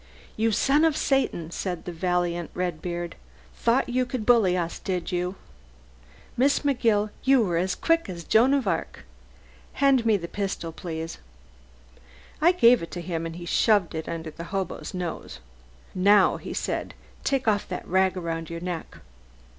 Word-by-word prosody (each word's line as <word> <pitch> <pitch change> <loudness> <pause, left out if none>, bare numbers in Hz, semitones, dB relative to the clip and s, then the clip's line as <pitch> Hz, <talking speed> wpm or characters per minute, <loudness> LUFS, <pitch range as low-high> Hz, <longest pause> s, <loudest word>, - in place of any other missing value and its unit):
"You 225 +1 +1
son 275 +8 +3
of 320 -2 +3
Satan!" 220 - 0
said 180 -1 -4
the 180 - -4
valiant 175 0 -1
Redbeard. 175 -1 -3 0.4
"Thought 240 +3 +1
you 255 +1 +1
could 240 -3 -4
bully 210 -7 +4
us, 170 -1 -3
did 180 -2 -3
you? 180 +1 -1 1.0
Miss 275 +3 +3
McGill, 230 -7 +1
you 265 -3 +5
were 175 -5 0
as 185 +2 0
quick 330 -7 +1
as 170 -2 -6
Joan 245 - +4
of 265 -7 -1
Arc. 165 - -3 0.7
Hand 270 -3 +3
me 220 -2 +3
the 170 -3 -6
pistol, 195 -4 -3
please." 165 -1 -6 1.2
I 340 +3 +6
gave 245 -9 +5
it 165 - -6
to 175 - -4
him, 165 -1 -3
and 165 - -7
he 175 0 -8
shoved 205 0 +2
it 160 -1 -4
under 165 -1 -5
the 170 +2 -8
hobo's 190 0 -4
nose. 175 - -5 0.5
"Now," 195 +1 +4
he - - -8
said, - - -3 0.3
"take 265 -3 0
off 205 -2 +2
that 180 - -6
rag 190 +1 +2
around 165 -2 -4
your 170 0 -6
neck." 175 -2 -5
185 Hz, 160 wpm, -26 LUFS, 170-235 Hz, 1.2 s, I